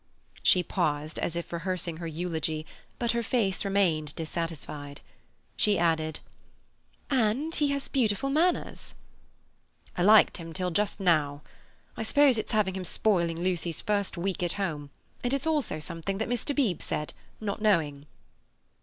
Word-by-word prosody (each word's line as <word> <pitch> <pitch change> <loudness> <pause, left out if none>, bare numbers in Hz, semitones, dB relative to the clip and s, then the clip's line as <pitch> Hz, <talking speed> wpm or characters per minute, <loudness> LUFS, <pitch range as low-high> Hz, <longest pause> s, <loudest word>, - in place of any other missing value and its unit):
She 180 - +5
paused, 155 -4 -1
as 170 - -2
if 170 0 -5
rehearsing 170 -1 -2
her 170 0 -5
eulogy, 160 -1 -2 0.3
but 235 -1 +1
her 235 - 0
face 220 -5 0
remained 175 -7 +1
dissatisfied. 155 -3 -5 0.6
She 210 -1 +3
added: 160 -2 +1 0.9
"And 260 +5 +1
he 295 - +2
has 280 -1 -2
beautiful 260 +1 +1
manners." 340 +5 0 1.0
"I - - -1
liked 210 +3 +6
him 165 -2 -8
till 180 +1 -2
just 205 +4 0
now. 150 -6 +2 0.5
I - - -5
suppose 265 +1 +4
it's - - -4
having 210 -4 +2
him 190 - -3
spoiling 170 -3 +1
Lucy's 175 -2 -1
first 205 -3 0
week 185 +2 -2
at 175 -1 0
home; 155 -8 -3 0.3
and 245 +2 +1
it's 275 - -2
also 300 - 0
something 170 +4 -3
that 220 - -2
Mr. 245 +4 -1
Beebe 225 - +1
said, 150 - -3 0.3
not 210 -1 -3
knowing." 155 -9 +1
185 Hz, 145 wpm, -28 LUFS, 165-220 Hz, 1.0 s, liked